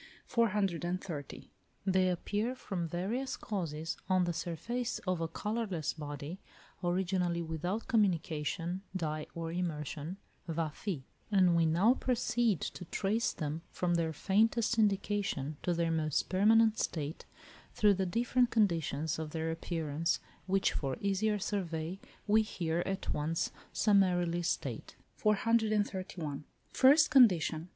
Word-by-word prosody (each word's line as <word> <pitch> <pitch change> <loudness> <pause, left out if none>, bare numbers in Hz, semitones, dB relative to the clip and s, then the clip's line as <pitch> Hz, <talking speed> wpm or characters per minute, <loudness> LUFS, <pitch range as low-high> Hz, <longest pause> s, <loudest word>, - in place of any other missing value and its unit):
430. 185 - -1 0.3
They 185 -1 +3
appear 210 +7 -1
from 180 -8 -3
various 210 +11 -2
causes 165 -6 -3
on 185 -1 +4
the 175 -1 0
surface 235 +10 -3
of 185 -3 0
a 165 - 0
colourless 200 -2 -2
body, 150 +3 -6 0.4
originally, 175 -1 0
without 170 +7 -3
communication, 170 -3 0
die 155 -3 -2
or 165 -1 -4
immersion 165 -1 -3 0.3
(βαφή); 160 0 -3 0.3
and 185 -4 +5
we 165 -1 +4
now 185 +9 +4
proceed 240 -5 +1
to - - -5
trace 210 +7 0
them, 155 +1 -4
from 175 -1 -1
their 165 -1 +1
faintest 220 +7 +2
indication 200 -8 0
to 180 - 0
their 170 -1 +1
most 155 -2 0
permanent 220 +3 +4
state, 155 -2 -3 0.5
through 210 -1 +5
the 190 -1 -1
different 240 +5 +2
conditions 165 - +1
of 160 -1 -4
their 160 +1 -2
appearance, 165 -1 -1 0.3
which 195 +1 +2
for 135 -3 -2
easier 200 +2 +1
survey 185 -3 -3 0.3
we 215 +1 +5
here 170 -5 -2
at 195 0 -2
once 160 +3 -1 0.2
summarily 180 -4 +3
state. 170 - -3 0.2
431. 205 -8 0 0.3
First 290 +4 +6
condition. 180 - +5
180 Hz, 120 wpm, -32 LUFS, 165-210 Hz, 0.5 s, First